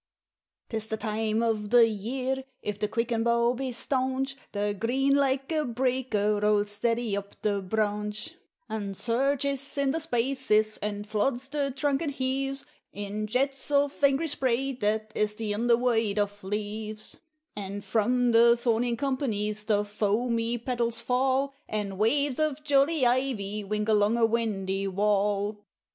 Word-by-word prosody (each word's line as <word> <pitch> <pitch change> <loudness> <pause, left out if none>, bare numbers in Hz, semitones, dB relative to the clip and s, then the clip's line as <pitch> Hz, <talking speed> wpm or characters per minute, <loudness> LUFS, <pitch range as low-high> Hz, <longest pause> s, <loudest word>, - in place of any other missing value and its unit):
'Tis 220 -1 -3
the 220 - -2
time 220 0 -1
o' 230 -1 +3
the 225 +2 +4
year, 255 +5 -2 0.2
if 210 -1 -3
the 210 - 0
quicken 230 +1 -1
bough 235 +1 +3
be 260 +1 -3
staunch, 265 +2 -1 0.2
The 205 0 -1
green, 260 +7 +1
like 270 0 +1
a 310 -1 +1
breaker, 240 -4 0
rolls 210 0 +2
steady 230 +1 0
up 200 0 -7
the 205 -2 +1
branch, 210 - -2 0.3
And 200 -3 -4
surges 275 +3 0
in 280 -1 +2
the 320 - -1
spaces, 245 -7 +1
and 205 0 -4
floods 240 +5 -1
the 285 -1 -1
trunk, 275 +2 0
and 310 -4 -1
heaves 270 +1 -2 0.3
In 205 +1 -4
jets 270 +5 0
of 285 0 +1
angry 280 +4 +3
spray 270 -2 +1
that 215 -3 -1
is 210 0 0
the 215 -1 -2
under 235 +2 +3
white 225 -4 +1
of 205 -1 -1
leaves; 210 +2 -4 0.4
And 200 0 -5
from 245 +2 +2
the 235 +1 +6
thorn 235 -1 +1
in 240 -1 -1
companies 215 -6 -1
the 210 -1 +2
foamy 230 +3 0
petals 235 -1 -1
fall, 265 +3 +1 0.2
And 200 -3 -3
waves 280 +5 +2
of 305 -1 0
jolly 285 0 +3
ivy 240 -5 0
wink 210 +1 -2
along 215 +1 +3
a 230 - +4
windy 195 -4 -1
wall. 205 +1 0
230 Hz, 150 wpm, -27 LUFS, 210-265 Hz, 0.4 s, the